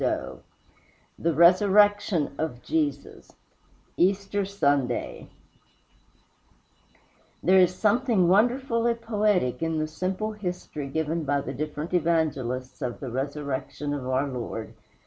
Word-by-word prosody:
XXIX - - -2 0.8
THE 170 0 +1
RESURRECTION 200 0 +4
OF 145 -6 -3
JESUS 145 -3 -3 0.6
Easter 195 +2 +1
Sunday 140 -10 -1 2.1
There 190 +1 +5
is 180 0 +4
something 215 -2 +2
wonderfully 235 +3 +2
poetic 210 - 0
in 165 -1 -1
the 155 - 0
simple 190 +6 -3
history 180 -8 -5
given 160 +3 -2
by 145 -1 0
the 135 - -6
different 150 +4 -5
Evangelists 150 -7 -1
of 120 -1 -3
the 130 -4 -6
resurrection 140 +2 -3
of 135 -3 -4
our 130 +2 0
Lord. 120 -4 -5
165 Hz, 110 wpm, -26 LUFS, 140-200 Hz, 2.1 s, There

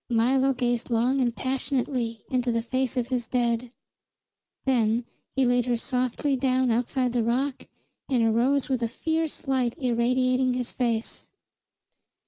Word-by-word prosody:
Milo 260 +3 +3
gazed 245 -1 -1
long 245 +4 +2
and 240 -2 0
passionately 255 -3 -2
into 250 -1 +1
the 230 0 0
face 255 +1 -1
of 245 -1 -1
his 245 -3 -1
dead; 240 -1 0 0.9
then 235 -3 +2 0.3
he 265 -1 +3
laid 245 0 +2
her 240 -1 +1
softly 255 +3 -1
down 260 -1 +1
outside 250 +2 0
the 240 -2 +1
rock 255 +4 -1 0.4
and 250 -4 +2
arose 245 +5 +2
with 260 -3 -1
a 230 - +1
fierce 320 +4 -3
light 255 -3 0
irradiating 255 +1 +1
his 250 -1 -3
face. 230 -3 -2
250 Hz, 140 wpm, -26 LUFS, 235-260 Hz, 0.9 s, Milo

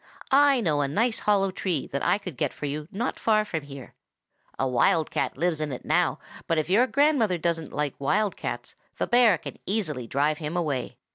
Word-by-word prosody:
I 275 -2 +5
know 155 -7 +1
a 140 - +1
nice 225 - 0
hollow 195 -2 +2
tree 180 -5 -2
that 140 - -2
I - - +3
could 185 -7 -8
get - - -1
for - - -5
you 150 +1 -4
not 230 +5 -3
far 215 -1 +2
from 165 -6 -3
here. 140 -2 -11 0.6
A 135 - 0
wild 130 +5 +2
cat 135 - -2
lives 165 0 0
in 150 -2 -2
it 125 - -7
now, - - +2 0.3
but 165 - +1
if 155 +3 -1
your 235 +6 +5
grandmother 260 - +2
doesn't 165 -1 -2
like 150 -2 -2
wild 200 +9 +1
cats, - - -6 0.2
the - - 0
bear 240 -6 +5
can - - -9
easily 155 - -2
drive 145 +5 0
him 155 +2 -3
away. 150 -7 -2
165 Hz, 205 wpm, -26 LUFS, 145-215 Hz, 0.6 s, I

